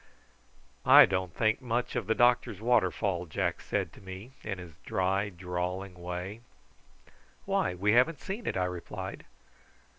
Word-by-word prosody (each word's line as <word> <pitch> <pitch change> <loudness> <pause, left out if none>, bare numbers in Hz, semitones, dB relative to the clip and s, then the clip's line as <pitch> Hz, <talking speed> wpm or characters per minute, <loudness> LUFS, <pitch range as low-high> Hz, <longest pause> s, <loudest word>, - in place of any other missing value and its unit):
"I - - +9
don't 95 -1 -2
think 110 - +1
much 120 -1 -2
of - - -2
the 110 - +2
doctor's 120 -5 +3
waterfall," 100 -5 +1
Jack 85 +1 -1
said - - -2
to - - -15
me, 95 +5 -9
in 95 - -4
his 90 -3 -10
dry 95 +2 0
drawling 90 +1 -4
way. 90 +4 -6 1.0
"Why, 90 - 0
we 100 +4 +2
haven't 125 +7 +4
seen 205 +4 -6
it!" - - -1
I 90 - +1
replied. 90 -1 -6
95 Hz, 145 wpm, -30 LUFS, 90-110 Hz, 1.0 s, I